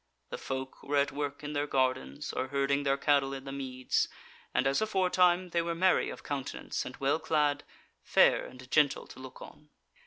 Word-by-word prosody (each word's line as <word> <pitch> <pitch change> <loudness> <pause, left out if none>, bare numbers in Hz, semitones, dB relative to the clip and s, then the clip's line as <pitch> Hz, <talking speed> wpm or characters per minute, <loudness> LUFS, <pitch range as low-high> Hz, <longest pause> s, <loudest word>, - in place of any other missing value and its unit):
The - - -5
folk 130 0 -5
were 145 +1 -1
at 140 +1 +2
work 145 +1 -4
in 150 0 -4
their 145 0 -1
gardens, 130 - -1
or 130 - -2
herding 140 +1 +1
their 140 -1 +1
cattle 140 -1 +2
in 135 - -7
the 135 - -7
meads, 130 -2 -1 0.4
and 130 - +1
as 135 +6 +2
aforetime 185 -3 +2
they 170 - +2
were 170 0 -2
merry 185 +2 +3
of - - -8
countenance 140 -2 -4
and - - -9
well 140 +3 +1
clad, 150 -3 +1 0.4
fair - - +4
and 130 0 -12
gentle 145 -2 +3
to - - -13
look 130 -1 -10
on. 150 0 -14
140 Hz, 190 wpm, -30 LUFS, 135-150 Hz, 0.4 s, fair